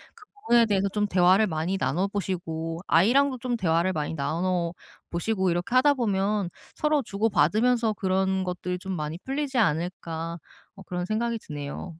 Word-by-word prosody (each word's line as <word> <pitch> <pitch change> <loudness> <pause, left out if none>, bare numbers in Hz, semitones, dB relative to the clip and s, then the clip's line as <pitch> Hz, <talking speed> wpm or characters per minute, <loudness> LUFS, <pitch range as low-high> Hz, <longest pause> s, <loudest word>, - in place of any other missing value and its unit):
그 430 - -17 0.2
부분에 235 -1 +6
대해서 200 -2 +1
좀 210 +1 0
대화를 185 +2 +4
많이 170 +3 -1
나눠 170 +7 0
보시고 165 -5 -3
아이랑도 255 +10 +4
좀 245 0 -2
대화를 175 -2 +1
많이 150 -1 -2
나눠 170 +4 -1 0.4
보시고 190 +1 0
이렇게 175 +7 -2
하다 285 +3 +6
보면 205 -5 0 0.2
서로 300 -1 +1
주고받으면서 225 +2 +2
그런 190 0 0
것들이 180 0 -3
좀 190 +1 -5
많이 155 +1 -4
풀리지 275 0 -2
않을까 165 -1 -1 0.3
뭐 195 -1 -13
그런 180 0 -3
생각이 230 +3 -1
드네요. 145 -5 -6
190 Hz, 355 characters per minute, -26 LUFS, 170-225 Hz, 0.4 s, 부분에